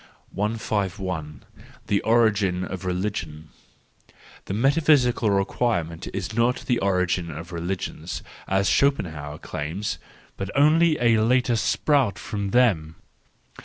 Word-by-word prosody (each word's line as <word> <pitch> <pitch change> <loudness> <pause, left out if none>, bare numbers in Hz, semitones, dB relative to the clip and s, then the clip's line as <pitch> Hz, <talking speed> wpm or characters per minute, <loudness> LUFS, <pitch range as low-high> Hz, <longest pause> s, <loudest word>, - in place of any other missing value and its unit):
I 105 +3 -1
5 100 -3 -2
I 90 -4 -3 0.6
The 100 - +1
Origin 105 -5 +2
of 95 -1 -6
Religion. 90 -5 -3 0.4
— - - -25
The - - -4
metaphysical 135 -2 +3
requirement 95 -4 -1
is 95 +2 -4
not 120 +2 +1
the 120 - +1
origin 90 -2 0
of 85 +1 -8
religions, 85 +2 -4 0.2
as 95 0 +1
Schopenhauer 80 - 0
claims, 80 +10 -4 0.4
but 95 0 -4
only 155 +2 +4
a 115 -2 +4
later 125 +1 +2
sprout 130 +2 +1
from 100 -2 -4
them. 95 -10 +2
100 Hz, 120 wpm, -24 LUFS, 90-120 Hz, 0.6 s, only